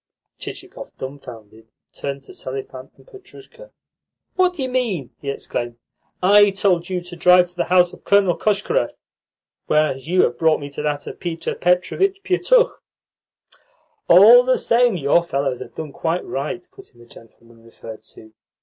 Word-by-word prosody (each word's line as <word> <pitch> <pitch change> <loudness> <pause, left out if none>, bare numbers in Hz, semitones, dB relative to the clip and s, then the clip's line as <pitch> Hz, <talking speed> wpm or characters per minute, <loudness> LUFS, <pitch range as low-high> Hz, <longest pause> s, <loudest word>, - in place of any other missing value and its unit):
Chichikov, - - -10
dumbfounded, 115 -5 -10 0.3
turned 140 -1 -6
to - - -13
Selifan 130 0 -8
and - - -21
Petrushka. 415 +3 -15 0.7
"What 365 -1 +2
do 285 - -4
you - - -2
mean?" 225 - -2
he 140 - -5
exclaimed. 120 -3 -5 0.5
"I 205 +2 +6
told 190 -3 0
you 180 -1 -2
to 175 0 -11
drive 180 +1 +4
to 180 - -16
the 175 - -1
house 180 -1 +3
of - - -15
Colonel 200 -3 +3
Koshkarev, 215 - 0 0.7
whereas 150 -3 0
you 180 +2 +3
have 120 0 -1
brought 160 -1 +3
me 145 0 -8
to 140 - -6
that 145 -1 -3
of - - -9
Peter 170 -2 -4
Petrovitch 375 - 0
Pietukh." 475 +6 +2 1.3
"All 215 +8 +8
the 255 +1 +1
same, 235 -4 +2
your 145 +2 +2
fellows 140 -6 -2
have - - -10
done 155 -2 -6
quite 165 +4 -2
right," 175 +6 -5
put - - -16
in - - -22
the 120 - -16
gentleman 115 0 -18
referred 115 -1 -12
to. 110 0 -16
175 Hz, 160 wpm, -20 LUFS, 135-210 Hz, 1.3 s, All